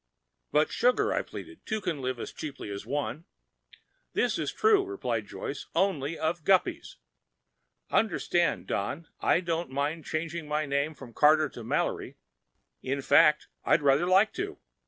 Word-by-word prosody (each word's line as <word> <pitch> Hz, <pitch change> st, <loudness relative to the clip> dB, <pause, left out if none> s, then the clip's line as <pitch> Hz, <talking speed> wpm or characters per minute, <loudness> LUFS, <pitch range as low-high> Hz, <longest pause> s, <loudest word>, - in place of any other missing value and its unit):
"But, 150 Hz, +1 st, +3 dB
sugar," 250 Hz, +1 st, +2 dB
I -, -, +1 dB
pleaded, 345 Hz, -1 st, -10 dB
"two 220 Hz, -1 st, -2 dB
can 170 Hz, -8 st, -3 dB
live 130 Hz, -1 st, -2 dB
as -, -, -5 dB
cheaply 140 Hz, -8 st, -7 dB
as 100 Hz, +2 st, -6 dB
one—" 145 Hz, +4 st, -3 dB, 0.9 s
"This -, -, +1 dB
is -, -, -1 dB
true," 430 Hz, -2 st, +4 dB
replied 385 Hz, 0 st, -3 dB
Joyce, -, -, -6 dB
"only 165 Hz, -5 st, +1 dB
of 160 Hz, +1 st, -1 dB
guppies. 330 Hz, -, +2 dB, 1.0 s
Understand, 175 Hz, -5 st, +1 dB
Don, 140 Hz, +12 st, -3 dB
I 175 Hz, -, +3 dB
don't 170 Hz, -2 st, -2 dB
mind 145 Hz, +4 st, -2 dB
changing 165 Hz, 0 st, -3 dB
my 150 Hz, +1 st, 0 dB
name 140 Hz, +2 st, -1 dB
from 125 Hz, -5 st, -12 dB
Carter 155 Hz, +3 st, +5 dB
to 120 Hz, -, -9 dB
Mallory. 110 Hz, -, -2 dB, 0.6 s
In 135 Hz, +1 st, -2 dB
fact, 150 Hz, +2 st, +5 dB, 0.2 s
I'd 150 Hz, -, +3 dB
rather 140 Hz, +5 st, +4 dB
like 190 Hz, +4 st, +4 dB
to. 395 Hz, +2 st, -4 dB
155 Hz, 150 wpm, -28 LUFS, 140-185 Hz, 1.0 s, Carter